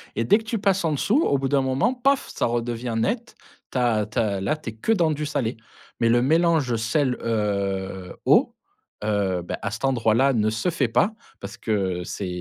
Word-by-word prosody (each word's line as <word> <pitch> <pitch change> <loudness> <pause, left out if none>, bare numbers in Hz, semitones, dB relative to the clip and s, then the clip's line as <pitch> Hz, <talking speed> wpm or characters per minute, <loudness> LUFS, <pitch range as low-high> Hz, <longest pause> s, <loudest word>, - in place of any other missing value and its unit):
et 115 - 0
dès 160 - +5
que - - -11
tu 225 +1 -2
passes 195 -2 +1
en 160 - +1
dessous 215 - +2
au 140 - +2
bout 135 0 -1
d'un 140 0 +3
moment 130 - +1
paf! 270 +2 +1
Ça - - -1
redevient 120 0 -2
net, 225 - -2 0.4
tu - - -3
as 115 -4 +2
tu 105 - -9
as 100 -4 0
là, 100 +11 0
tu 135 -6 -7
es - - -15
que 110 - -2
dans 170 -7 +3
du 150 0 -2
salé. 135 -6 -2 0.4
Mais 115 - +3
le 120 +1 +4
mélange 160 -3 +2
sel, 125 +4 +1
heu, 100 -4 -2
eau, - - +4 0.5
heu, 100 -4 0
beh, - - -4
à 100 - -2
cet 110 +5 -3
endroit-là 130 +1 +3
ne 110 -3 +2
se 110 +11 -1
fait 150 -7 0
pas 120 - +2 0.3
parce 100 +4 -8
que 95 -6 -1
c'est 95 +2 -5
120 Hz, 215 wpm, -24 LUFS, 110-150 Hz, 0.5 s, dès